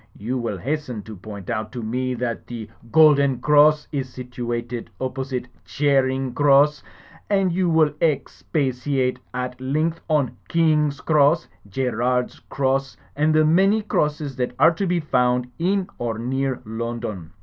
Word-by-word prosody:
You 125 +5 -3
will 115 -4 -3
has* 150 - -3
ten 115 -5 -6
to 110 +1 -9
point 100 0 -9
out 110 -1 -3
to 120 -2 -5
me 125 +3 -2
that 120 -1 -4
the 115 -3 -6 0.2
Golden 140 -4 +5
Cross 150 +2 +4
is 135 -4 -3
situated 120 -2 -5
opposite 130 -1 -3 0.2
Charing 135 -2 +1
Cross, 145 +1 +4 0.5
and 195 -3 +2
you 180 0 +1
will 160 -3 +3
expatiate 135 -4 -1
at 125 0 -5
length 155 +5 -1
on 150 -5 +1
King's 150 -3 +2
Cross, 155 +2 +3 0.2
Gerrard's 125 +2 -1
Cross 135 0 -1 0.2
and 150 +2 +2
the 155 0 +5
many 195 +7 +3
crosses 150 -7 -1
that 125 -1 -2
are 160 +5 +6
to 195 +3 -2
be 175 0 +1
f 155 -3 -6
otmd 125 0 +2
in 190 +2 +1
or 115 -2 -2
near 130 +2 -2
London. 110 -6 -5
135 Hz, 150 wpm, -22 LUFS, 125-150 Hz, 0.5 s, are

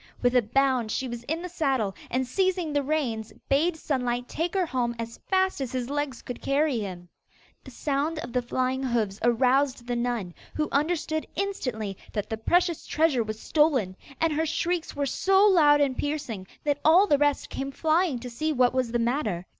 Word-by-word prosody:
With 245 +1 +3
a 250 - +6
bound 250 0 +1
she 260 - -1
was 240 -1 -5
in 320 +5 -2
the - - -3
saddle, 270 - 0 0.2
and 260 +2 0
seizing 365 +2 0
the 290 - +2
reins 260 -7 -2 0.2
bade 320 +5 +2
Sunlight 250 -5 -1
take 335 +4 -3
her 375 -2 +2
home 245 -5 -1
as 230 0 -6
fast 375 -4 +2
as 260 - -3
his 255 0 -3
legs 290 -3 -3
could 245 - -7
carry 275 -2 +1
him. 180 -4 -6 0.6
The - - -11
sound 290 +5 -1
of 240 -6 -6
the 250 - +2
flying 255 +2 -1
hoofs 225 -6 -1
aroused 255 +2 +2
the 245 0 -2
nun, 235 -7 -2 0.2
who 305 -1 -1
understood 315 +1 0
instantly 250 - -3 0.2
that 210 -1 -3
the 220 - -1
precious 345 +8 +1
treasure 305 -5 +2
was 215 0 -6
stolen, 270 - +2 0.2
and 325 -1 +2
her 320 +2 0
shrieks 340 +2 -1
were 285 0 0
so 385 +8 +3
loud 300 -7 +6
and 275 -3 +2
piercing 255 -11 -3 0.2
that 290 -1 0
all 345 +6 +6
the 290 -8 +3
rest 290 -1 +1
came 275 0 -3
flying 320 0 +1
to 250 - -6
see 310 +7 -1
what 250 -4 +3
was 255 -3 0
the 240 - +1
matter. 230 - -1
270 Hz, 195 wpm, -26 LUFS, 240-315 Hz, 0.6 s, a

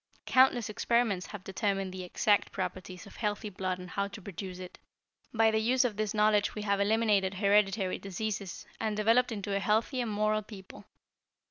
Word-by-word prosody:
Countless 255 -3 +4
experiments 215 -3 0
have 205 -3 -9
determined 195 -1 -2
the 185 0 -6
exact 205 +3 +1
properties 185 -1 -5
of 200 - -14
healthy 210 -1 -2
blood 185 -1 -2
and 180 -1 -10
how 200 0 -1
to 200 +2 -10
produce 185 -1 -7
it. 185 -1 -10 0.5
By 225 -1 +3
the 220 - +1
use 250 +4 +2
of 230 -4 -1
this 215 +1 -2
knowledge 210 -1 +3
we 210 - -4
have 200 -1 +1
eliminated 205 -2 +2
hereditary 200 -1 +2
diseases, 200 0 -5
and 215 -1 -2
developed 230 +4 +3
into 200 -2 -3
a - - +1
healthy 220 +6 +1
and 235 - -2
moral 215 0 +1
people. 200 -3 -12
205 Hz, 175 wpm, -30 LUFS, 195-220 Hz, 0.5 s, Countless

